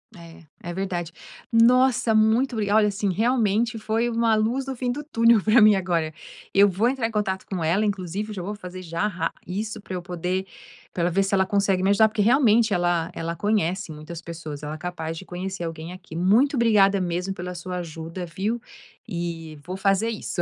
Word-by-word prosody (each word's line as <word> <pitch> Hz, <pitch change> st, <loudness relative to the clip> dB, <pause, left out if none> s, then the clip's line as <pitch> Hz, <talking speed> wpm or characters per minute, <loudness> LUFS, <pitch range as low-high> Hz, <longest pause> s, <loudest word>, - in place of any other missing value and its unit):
É, 170 Hz, -2 st, -13 dB, 0.3 s
é -, -, -4 dB
verdade. 175 Hz, -3 st, -3 dB, 0.4 s
Nossa, 245 Hz, 0 st, +4 dB
muito 220 Hz, +5 st, +3 dB
obri 210 Hz, -3 st, -1 dB
olha, 215 Hz, 0 st, +5 dB
assim, 205 Hz, -1 st, -1 dB
realmente 225 Hz, +2 st, +1 dB
foi 225 Hz, +2 st, 0 dB
uma 230 Hz, -1 st, +2 dB
luz 230 Hz, +5 st, 0 dB
no 270 Hz, -, -4 dB
fim 250 Hz, 0 st, -3 dB
do 280 Hz, +5 st, -3 dB
túnel 230 Hz, -7 st, +3 dB
para 220 Hz, +2 st, +5 dB
mim 215 Hz, -1 st, +7 dB
agora. 170 Hz, -4 st, -1 dB, 0.4 s
Eu 200 Hz, +1 st, +6 dB
vou 200 Hz, +5 st, +1 dB
entrar 250 Hz, -3 st, 0 dB
em -, -, -8 dB
contato 200 Hz, -3 st, -2 dB
com 185 Hz, -3 st, -4 dB
ela, 170 Hz, +7 st, +2 dB
inclusive 195 Hz, +1 st, -3 dB
eu -, -, -5 dB
já 185 Hz, -, -4 dB
vou 205 Hz, +4 st, -4 dB
fazer 185 Hz, -2 st, -9 dB
já 170 Hz, +2 st, -2 dB
rá 170 Hz, -5 st, -3 dB
isso 210 Hz, +5 st, -4 dB
para 190 Hz, -, -8 dB
eu 180 Hz, -, -3 dB
poder 180 Hz, +2 st, -3 dB, 0.5 s
pra 170 Hz, -, -1 dB
ela 175 Hz, -, +1 dB
ver 195 Hz, +3 st, +2 dB
se 195 Hz, -, -3 dB
ela 190 Hz, 0 st, +3 dB
consegue 195 Hz, -1 st, +1 dB
me 190 Hz, -, +3 dB
ajudar, 205 Hz, +2 st, +5 dB
porque 215 Hz, 0 st, -2 dB
realmente 230 Hz, -2 st, +4 dB
ela 175 Hz, -2 st, +1 dB
ela 165 Hz, +1 st, -4 dB
conhece 195 Hz, -3 st, 0 dB
muitas 155 Hz, +2 st, -8 dB
pessoas, 160 Hz, -4 st, -8 dB
ela 150 Hz, +1 st, -4 dB
é -, -, -8 dB
capaz 165 Hz, -1 st, -5 dB
de 190 Hz, -, -9 dB
conhecer 180 Hz, 0 st, -5 dB
alguém 165 Hz, 0 st, -6 dB
aqui. 180 Hz, -3 st, -11 dB
Muito 215 Hz, -, +3 dB
obrigada 205 Hz, -5 st, +4 dB
mesmo 180 Hz, +2 st, -2 dB
pela 180 Hz, -1 st, -6 dB
sua 180 Hz, +1 st, -5 dB
ajuda, 165 Hz, +1 st, -6 dB
viu. 200 Hz, +8 st, -3 dB, 0.5 s
E, 170 Hz, -5 st, -5 dB
vou 180 Hz, +2 st, -5 dB
fazer 195 Hz, +3 st, +2 dB
isso. 210 Hz, -5 st, -3 dB
195 Hz, 205 wpm, -24 LUFS, 175-220 Hz, 0.5 s, mim